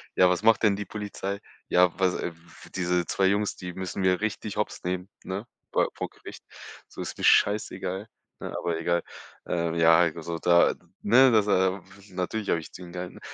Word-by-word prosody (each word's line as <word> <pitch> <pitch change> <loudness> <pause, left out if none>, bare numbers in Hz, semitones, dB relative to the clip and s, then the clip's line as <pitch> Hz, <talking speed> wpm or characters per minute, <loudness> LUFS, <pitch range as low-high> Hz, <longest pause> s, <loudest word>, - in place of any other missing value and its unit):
„Ja, 90 - +6
was 90 -1 +1
macht 110 +1 +4
denn 100 -2 +4
die 105 - -4
Polizei? 100 -1 -5 0.3
Ja, 90 0 +4
was, 95 -1 +3
w 85 - -3 0.4
diese 90 -1 0
2 95 - +1
Jungs, 100 +2 +1
die 90 -1 -7
müssen 95 +1 -4
wir 90 0 +2
richtig 105 -1 -3
Hopps 105 - -3
nehmen, 90 +1 -3 0.2
ne, 100 +4 -4 0.3
bei - - +3
vor - - -3
Gericht. - - -12 0.4
So - - -9
ist - - -6
mir - - -2
scheißegal“, 100 -1 +2 0.3
ne? - - -6
Aber 85 -2 -2
egal, 85 +1 0 0.4
ähm, 85 -1 -1
ja, 80 0 +6
heik 85 -2 +3
also, 85 0 -5
da 85 0 +4 0.3
ne, 130 +5 +6
das 105 -2 +4 0.6
natürlich 95 +3 -3
habe 85 - +2
ich - - -12
zu 90 - -10
ihm 85 0 -11
gehalten, 90 0 -6
90 Hz, 190 wpm, -27 LUFS, 85-100 Hz, 0.6 s, Ja